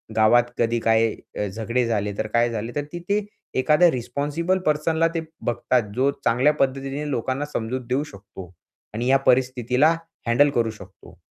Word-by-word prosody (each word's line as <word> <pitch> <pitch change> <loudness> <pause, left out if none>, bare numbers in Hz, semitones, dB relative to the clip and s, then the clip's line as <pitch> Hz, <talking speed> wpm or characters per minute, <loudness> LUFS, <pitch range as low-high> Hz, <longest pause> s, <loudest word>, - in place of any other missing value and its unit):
गावात 110 +2 +5
कधी 115 0 +1
काय 115 0 +2 0.3
झगडे 115 +5 -1
झाले 105 -3 -1
तर - - -2
काय 120 +2 +2
झाले 115 0 -4
तर 145 - -1
तिथे 175 +4 -1 0.4
एखाद्या 155 +6 +5
रिस्पॉन्सिबल 145 +8 -1
पर्सनला 160 +2 +2
ते 165 - 0 0.2
बघतात. 120 +1 +1
जो 135 +2 +2
चांगल्या 130 +6 +3
पद्धतीने 135 +1 -2
लोकांना 130 +3 -2
समजूत 120 +3 -2
देऊ 130 +3 +1
शकतो 95 - -12 0.4
आणि 120 +3 -2
या 135 - +6
परिस्थितीला 130 +4 +3 0.3
हँडल 140 +5 +4
करू 115 -1 +2
शकतो. 110 - -15
125 Hz, 150 wpm, -23 LUFS, 115-145 Hz, 0.4 s, या